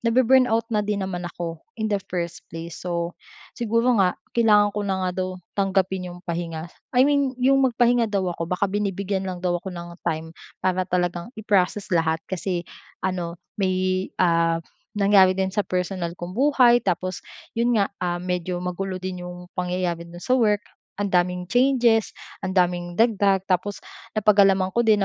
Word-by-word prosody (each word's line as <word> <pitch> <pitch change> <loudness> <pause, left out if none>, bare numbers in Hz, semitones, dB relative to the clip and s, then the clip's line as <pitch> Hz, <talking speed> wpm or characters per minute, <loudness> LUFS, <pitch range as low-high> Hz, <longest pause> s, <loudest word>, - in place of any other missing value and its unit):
nabe-burnout 240 -1 +4
na 210 - +3
din 205 -1 -1
naman 180 -2 -4
ako 165 -2 -6 0.2
in 215 -1 -1
the 200 - +1
first 170 -2 -3
place. 165 0 -8
So, 170 -1 -2 0.4
siguro 230 +2 +1
nga 180 -2 +2 0.2
kailangan 210 -3 +4
ko 210 - -2
na 195 - 0
nga 180 - 0
daw 185 - -1 0.2
tanggapin 190 -2 0
yung 175 0 -10
pahinga. 170 -1 -4 0.2
I 255 - +7
mean 280 -2 +2
yung 270 +2 +3
magpahinga 240 -1 +3
daw 190 -3 0
ako, 165 -1 -5
baka 180 +3 0
binibigyan 195 -1 -2
lang 180 0 -6
daw 175 -1 +1
ako 190 - -7
ng 175 -1 -8
time, 160 +1 -3 0.3
para 185 0 +1
talagang 175 +1 -1
i-proccess 200 -2 0
lahat. 160 -1 +1
Kasi 180 -1 -3 0.4
ano 175 -2 -2 0.2
may, 185 0 +1
ah, 170 -2 +3 0.4
nangyari 195 -2 +5
din 190 0 0
sa 210 - +1
personal 180 -2 -2
kong 175 +1 -6
buhay. 250 0 +5
Tapos, 185 0 -2 0.3
yun 235 +1 +1
nga, 200 -2 +1
ah, 175 -1 0
medyo 180 0 -2
magulo 185 +1 -3
din 185 -1 -5
'yong 180 0 -9
pangyayari 180 -2 -2
do'n 175 - -11
sa 255 - 0
work, 210 -5 +3 0.3
ang 205 -1 -2
daming 180 0 +1
changes 245 0 +3 0.2
ang 190 0 -4
daming 175 -1 +1
dagdag. 200 -4 +3
Tapos 195 +2 0 0.4
napag-alaman 195 -3 +4
ko 235 - +2
din 215 -3 +4
185 Hz, 165 wpm, -24 LUFS, 175-210 Hz, 0.4 s, I